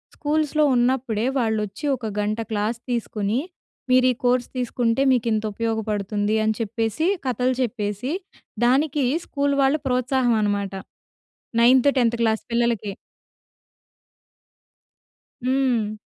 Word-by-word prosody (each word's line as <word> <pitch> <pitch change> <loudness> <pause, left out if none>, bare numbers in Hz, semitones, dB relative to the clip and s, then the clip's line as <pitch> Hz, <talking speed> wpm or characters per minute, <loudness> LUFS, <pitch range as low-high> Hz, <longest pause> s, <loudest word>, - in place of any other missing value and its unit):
స్కూల్స్‌లో 305 0 +1
ఉన్నప్పుడే 240 -3 +1
వాళ్ళోచ్చి 220 +2 -2
ఒక 240 - -8
గంట 210 +2 -1
క్లాస్ 215 +2 -1
తీసుకొని. 220 -1 -1 0.5
మీరు 255 0 +5
ఈ - - -1
కోర్స్ 245 0 +2
తీసుకుంటే, 245 0 0
మీకు 240 -2 0
ఇంత 215 0 0
ఉపయోగపడుతుంది 215 -2 -1
అని 220 0 +1
చెప్పేసి, 225 - -1 0.2
కథలు 255 0 0
చెప్పేసి, 215 0 -2 0.5
దానికి 280 +2 +2 0.2
స్కూల్ 280 -1 0
వాళ్ళు 275 +3 +2
ప్రోత్సాహం 250 -1 +1
అనమాట. 200 -2 -1 0.9
నైన్త్, 255 +3 +6
10థ్ 235 -1 +2
క్లాస్ 220 -1 +1
పిల్లలకి. 235 -4 0 2.5
హ్మ్. 255 -5 +1
235 Hz, 105 wpm, -23 LUFS, 215-255 Hz, 2.5 s, నైన్త్